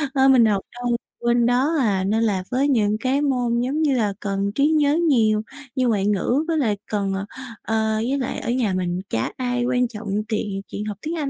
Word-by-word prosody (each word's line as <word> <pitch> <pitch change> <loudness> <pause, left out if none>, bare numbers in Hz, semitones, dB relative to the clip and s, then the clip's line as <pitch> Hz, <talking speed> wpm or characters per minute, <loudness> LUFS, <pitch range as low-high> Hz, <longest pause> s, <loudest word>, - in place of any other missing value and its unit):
nên 265 0 +5
mình 240 -3 +6
học 200 -3 +2
đâu 245 -1 -1 0.2
quên 240 0 +2
đó, 260 +7 +2
à. 200 -6 +1
Nên 220 +4 +1
là 195 -4 0
với 270 +3 +2
những 215 -4 +2
cái 265 +4 +1
môn 245 -4 +1
giống 280 +5 -1
như 285 -4 +2
là 210 -3 +1
cần 200 0 -2
trí 285 +1 +3
nhớ 305 -1 +3
nhiều 215 -5 +3 0.3
như 255 -1 +1
ngoại 205 -4 +1
ngữ 210 - +1
với 325 -1 0
lại 215 -8 +1
cần, 200 -2 0
ờ, 195 +1 -3 0.4
ờ, 220 0 0
với 245 +6 0
lại 255 - -3
ở - - -5
nhà 240 -6 +1
mình 180 0 -1
chả 115 - -1
ai 245 -1 -1
quan 250 -1 +1
trọng 215 -2 -9 0.2
tiện 205 -3 -2
chuyện 210 - -5
học 205 -2 -5
tiếng 325 +2 -3
Anh 285 -3 -2
235 Hz, 225 wpm, -22 LUFS, 205-260 Hz, 0.4 s, mình